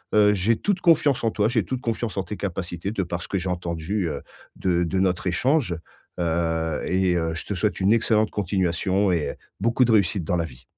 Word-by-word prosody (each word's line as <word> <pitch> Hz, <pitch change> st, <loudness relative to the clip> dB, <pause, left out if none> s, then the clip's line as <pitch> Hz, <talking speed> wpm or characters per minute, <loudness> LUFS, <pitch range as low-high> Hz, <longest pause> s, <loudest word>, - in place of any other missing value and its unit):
Heu, 105 Hz, -1 st, +6 dB
j'ai 105 Hz, +4 st, +2 dB
toute 200 Hz, -3 st, -1 dB
confiance 150 Hz, -7 st, +3 dB
en 115 Hz, -, +2 dB
toi, 105 Hz, 0 st, +1 dB
j'ai 110 Hz, -6 st, +1 dB
toute 130 Hz, +3 st, -3 dB
confiance 115 Hz, -2 st, -2 dB
en 95 Hz, -, +2 dB
tes 105 Hz, +4 st, -6 dB
capacités 90 Hz, -1 st, -4 dB
de 105 Hz, -, -1 dB
par 85 Hz, 0 st, -4 dB
ce -, -, -7 dB
que 95 Hz, -, -1 dB
j'ai 90 Hz, +1 st, -3 dB
entendu, 85 Hz, +1 st, -2 dB
heu, 70 Hz, -, -4 dB, 0.4 s
de 90 Hz, -2 st, +1 dB
de 95 Hz, +3 st, -1 dB
notre 90 Hz, -1 st, +1 dB
échange, 120 Hz, -, +1 dB, 0.4 s
heu, 80 Hz, -1 st, 0 dB
et 95 Hz, -1 st, +2 dB
heu, 80 Hz, -1 st, -1 dB
je 80 Hz, -, -5 dB
te -, -, -3 dB
souhaite 100 Hz, 0 st, 0 dB
une 95 Hz, -, +4 dB
excellente 110 Hz, -1 st, +2 dB
continuation 95 Hz, 0 st, +1 dB
et 75 Hz, -5 st, 0 dB
heu, -, -, -11 dB, 0.2 s
beaucoup 115 Hz, +4 st, +2 dB
de 115 Hz, -, +2 dB
réussite 100 Hz, -3 st, +2 dB
dans 90 Hz, -, 0 dB
la 85 Hz, -, 0 dB
vie. 65 Hz, -3 st, -13 dB
95 Hz, 225 wpm, -24 LUFS, 85-110 Hz, 0.4 s, Heu